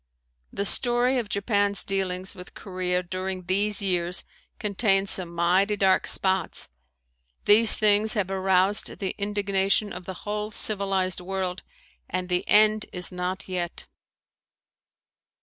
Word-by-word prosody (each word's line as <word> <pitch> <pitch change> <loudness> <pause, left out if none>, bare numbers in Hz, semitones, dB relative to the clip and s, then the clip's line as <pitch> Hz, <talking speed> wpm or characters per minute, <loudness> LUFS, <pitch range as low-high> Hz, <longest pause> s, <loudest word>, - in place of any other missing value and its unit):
The 200 - -3
story 245 +3 +2
of 225 -4 -5
Japan's 200 -1 0
dealings 190 -1 -3
with 180 -2 -12
Korea 180 -2 -2
during 185 +1 -5
these 200 +3 +1
years 180 -2 0 0.3
contains 200 -1 +1
some 180 -3 +2
mighty 180 +5 +1
dark 190 -1 +2
spots. 190 -2 -1 0.8
These 220 +2 +6
things 215 +1 +3
have 195 -3 -1
aroused 190 +1 +1
the 190 -2 -3
indignation 200 0 0
of 180 0 -9
the 190 - -6
whole 210 0 -3
civilized 195 -4 +1
world 185 0 -4 0.5
and 185 0 -3
the 180 0 0
end 215 0 +4
is 180 -1 +1
not 180 +1 -4
yet. 180 -2 -4
195 Hz, 125 wpm, -25 LUFS, 185-205 Hz, 0.8 s, These